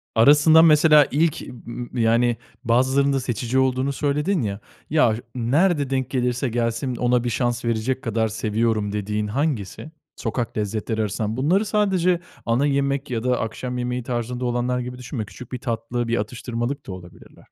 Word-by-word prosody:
Arasında 150 +7 +7
mesela 150 -2 +6
ilk 155 +2 +1 0.2
m 120 +1 -5
yani 115 +1 +3 0.3
bazılarında 130 +3 +2
seçici 125 +1 -1
olduğunu 130 +1 +1
söyledin 150 +5 0
ya, 100 -2 -3 0.3
ya 135 -8 +3 0.2
nerede 145 +4 +2
denk 130 -1 -1
gelirse 125 0 0
gelsin 120 +2 -1
ona 125 0 +1
bir 120 - -1
şans 120 +1 -1
verecek 115 +4 -1
kadar 115 -1 0
seviyorum 110 -1 -1
dediğin 105 +1 -2
hangisi? 135 - -3 0.2
Sokak 120 -2 -3
lezzetleri 110 +1 -2
arasından. 110 +2 -2
Bunları 180 +10 +2
sadece 185 -4 +2 0.3
ana 120 +5 +2
yemek 140 -1 0
ya 115 -2 -2
da 125 -1 +1
akşam 125 +3 -4
yemeği 125 0 -2
tarzında 120 +1 -3
olanlar 120 +1 0
gibi 125 0 -6
düşünme. 125 -3 -5
Küçük 125 +4 -12
bir 125 - -4
tatlı, 120 0 -3
bir 115 - 0
atıştırmalık 120 +4 -4
da - - -5
olabilirler. 90 -1 -12
125 Hz, 155 wpm, -23 LUFS, 115-140 Hz, 0.3 s, Arasında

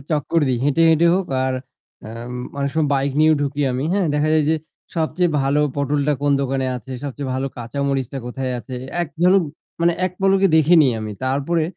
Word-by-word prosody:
চক্কর 155 +2 +1
দেই। 125 - 0
হেঁটে 145 +3 +2
হেঁটে 165 +2 +4
হোক 190 -1 -1 0.2
আর 130 0 0 0.5
উম 125 +4 -7
অনেক 140 0 -1
সময় 160 -2 +1
বাইক 135 0 0
নিয়েও 155 0 +5
ঢুকি 140 +1 -2
আমি। 130 +3 -2
হ্যাঁ 195 -3 +1
দেখা 150 +1 +1
যায় 155 - +3
যে 160 - +2 0.4
সবচেয়ে 170 +2 +1
ভালো 140 +2 +1 0.2
পটলটা 145 +1 +1
কোন 145 0 +3
দোকানে 135 0 -1
আছে, 125 +2 -11
সবচেয়ে 140 0 -5
ভালো 130 +1 -1
কাঁচা 120 +4 -6
মরিচটা 135 -1 -2
কোথায় 130 +1 -3
আছে। 120 +3 -8 0.3
একজন, 170 +3 +1 0.5
মানে 170 0 +4
এক 180 - -6
পলকে 195 0 +4
দেখে 160 +2 +5 0.3
আমি। 110 -1 -5
তারপরে 140 +5 0
140 Hz, 185 wpm, -20 LUFS, 130-160 Hz, 0.5 s, নিয়েও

